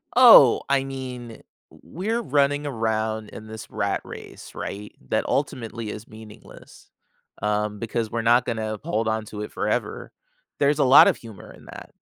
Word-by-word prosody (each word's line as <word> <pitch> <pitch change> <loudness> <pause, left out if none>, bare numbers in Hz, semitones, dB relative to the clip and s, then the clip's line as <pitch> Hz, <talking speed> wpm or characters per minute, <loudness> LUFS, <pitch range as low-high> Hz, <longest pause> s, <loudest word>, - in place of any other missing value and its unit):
Oh, 235 - +8
I 140 -1 +2
mean, 130 -3 -7
w 115 - -12 0.4
we're 220 +8 -3
running 145 - +1
around 110 -3 -2
in 110 - -11
this 110 -1 -9
rat - - -2
race, - - -11
right, 105 +1 -7
that - - 0
ultimately 115 -5 -3
is 105 +2 -8
meaningless, 110 -1 -15 0.5
um, 105 0 -1
because 115 -1 -3
we're 115 0 -2
not 120 +2 +3
gonna 110 -1 -3
uphold 110 +2 -3
on 110 0 -1
to 105 0 -8
it 105 - -6
forever. - - -3 0.5
There's 145 +1 +2
a - - +4
lot 130 +2 +8
of - - +2
humor 110 -6 -12
in - - -17
that. - - -11
115 Hz, 165 wpm, -23 LUFS, 110-135 Hz, 0.5 s, Oh